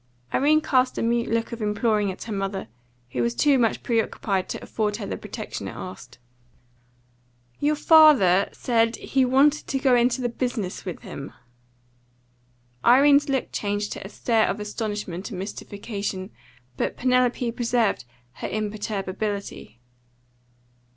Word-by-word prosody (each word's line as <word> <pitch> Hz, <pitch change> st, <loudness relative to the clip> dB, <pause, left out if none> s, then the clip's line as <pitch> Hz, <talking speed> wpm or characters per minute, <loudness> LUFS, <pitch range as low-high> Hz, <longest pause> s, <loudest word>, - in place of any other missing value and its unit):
Irene 305 Hz, +3 st, +4 dB
cast 255 Hz, -3 st, +1 dB
a -, -, -1 dB
mute 235 Hz, 0 st, +1 dB
look 230 Hz, 0 st, -1 dB
of 235 Hz, -1 st, -6 dB
imploring 210 Hz, -1 st, +1 dB
at 185 Hz, -, -8 dB
her 225 Hz, -, -7 dB
mother, 195 Hz, -, -3 dB, 0.4 s
who 125 Hz, -, -1 dB
was 120 Hz, 0 st, 0 dB
too 275 Hz, -, +4 dB
much 230 Hz, -2 st, +1 dB
preoccupied 215 Hz, -4 st, -1 dB
to -, -, -5 dB
afford 210 Hz, -2 st, -1 dB
her 215 Hz, -, -5 dB
the -, -, -4 dB
protection -, -, -6 dB
it -, -, -7 dB
asked. 130 Hz, -9 st, -9 dB, 1.4 s
"Your 300 Hz, +1 st, +2 dB
father 290 Hz, -, +6 dB
said 230 Hz, -1 st, +1 dB
he 265 Hz, -1 st, 0 dB
wanted 275 Hz, +4 st, +3 dB
to 270 Hz, -, -1 dB
go 265 Hz, -1 st, +3 dB
into 245 Hz, +1 st, +3 dB
the 250 Hz, -, 0 dB
business 235 Hz, -7 st, -3 dB
with 180 Hz, -, -6 dB
him." 140 Hz, -, -8 dB, 1.5 s
Irene's 280 Hz, +3 st, +5 dB
look 265 Hz, -2 st, -1 dB
changed 205 Hz, 0 st, -2 dB
to -, -, -8 dB
a 195 Hz, -, -8 dB
stare 225 Hz, 0 st, +1 dB
of 200 Hz, -, -2 dB
astonishment 210 Hz, -3 st, -4 dB
and 200 Hz, -, -6 dB
mystification, 200 Hz, 0 st, -5 dB, 0.5 s
but -, -, -2 dB
Penelope 250 Hz, -1 st, +2 dB
preserved 230 Hz, -, 0 dB, 0.3 s
her -, -, -6 dB
imperturbability. 205 Hz, -, -4 dB
225 Hz, 140 wpm, -24 LUFS, 200-250 Hz, 1.5 s, father